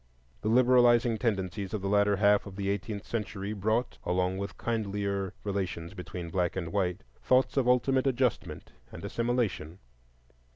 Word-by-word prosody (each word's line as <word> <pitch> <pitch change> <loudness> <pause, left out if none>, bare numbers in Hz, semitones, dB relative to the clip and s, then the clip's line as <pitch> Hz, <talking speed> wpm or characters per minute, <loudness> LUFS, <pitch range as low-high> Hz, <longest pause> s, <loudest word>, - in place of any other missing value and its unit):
The - - -3
liberalizing 120 -1 +4
tendencies 100 -2 -2
of 100 - -4
the - - -1
latter 100 0 +3
half 100 +1 +3
of 95 - -9
the 100 0 -1
eighteenth 100 +1 -4
century 105 -2 -4
brought, 110 +4 -1
along 90 +1 0
with 100 0 -5
kindlier 100 -4 -2
relations 95 -4 -3
between 90 -2 -7
black 90 -1 0
and 85 -3 -4
white, 95 -2 -1 0.2
thoughts 130 +1 +2
of 135 -3 +2
ultimate 130 +2 +3
adjustment 130 -2 -1 0.2
and - - -8
assimilation. 115 -9 -1
100 Hz, 150 wpm, -29 LUFS, 95-120 Hz, 0.2 s, liberalizing